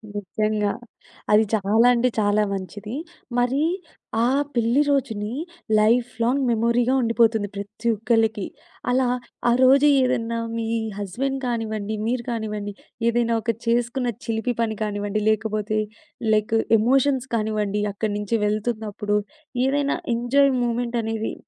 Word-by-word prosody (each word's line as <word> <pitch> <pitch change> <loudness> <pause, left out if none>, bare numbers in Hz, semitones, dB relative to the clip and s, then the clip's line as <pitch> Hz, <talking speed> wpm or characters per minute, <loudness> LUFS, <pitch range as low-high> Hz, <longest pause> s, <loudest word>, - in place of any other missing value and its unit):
నిజంగా. 210 +1 -1 0.6
అది 210 +1 +6
చాలా 220 +3 +3
అంటే, 245 +1 +2
చాలా 205 0 +3
మంచిది. 200 +4 -6 0.4
మరి 250 +4 +2 0.6
ఆ - - +4 0.3
పెళ్లి 235 +4 +3
రోజుని 225 -6 -1 0.5
లైఫ్‌లైంగ్ 235 +3 +2
మెమరీగా 235 +2 +2
ఉండిపోతుంది 230 -2 +2
ప్రతి 205 +4 -6
ఒక్కళ్ళకి, 220 -1 +1 0.4
అలా 255 +1 +2 0.4
ఆ - - +5
రోజు 275 +3 +6 0.2
ఏదన్నా 235 -2 0 0.2
మీ 225 -1 -2 0.3
హస్బెండ్ 265 +8 -2
కానివ్వండి, 220 -3 -2
మీరు 240 0 -1
కానివ్వండి 210 -3 -3 0.4
ఏదైనా 235 0 +1
ఒక 230 - -5 0.2
చేసుకున్న 240 +2 +1 0.2
చిలిపి 230 +2 -1
పని 220 -2 -1
కానివ్వండి 205 0 -2
లేకపోతే 215 0 0 0.5
లైక్ 215 +1 +1 0.2
ఎమోషన్స్ 265 +3 +2
కానివ్వండి 210 -2 -1
అక్కడి 210 +1 -2
నుంచి 210 +2 -1
వెళ్తున్నప్పుడు 210 -1 -1 0.5
ఏదైనా 280 +1 +1 0.2
ఎంజాయ్ 270 +4 +3
మూమెంటనేది 235 -2 -1
225 Hz, 110 wpm, -23 LUFS, 210-245 Hz, 0.6 s, అది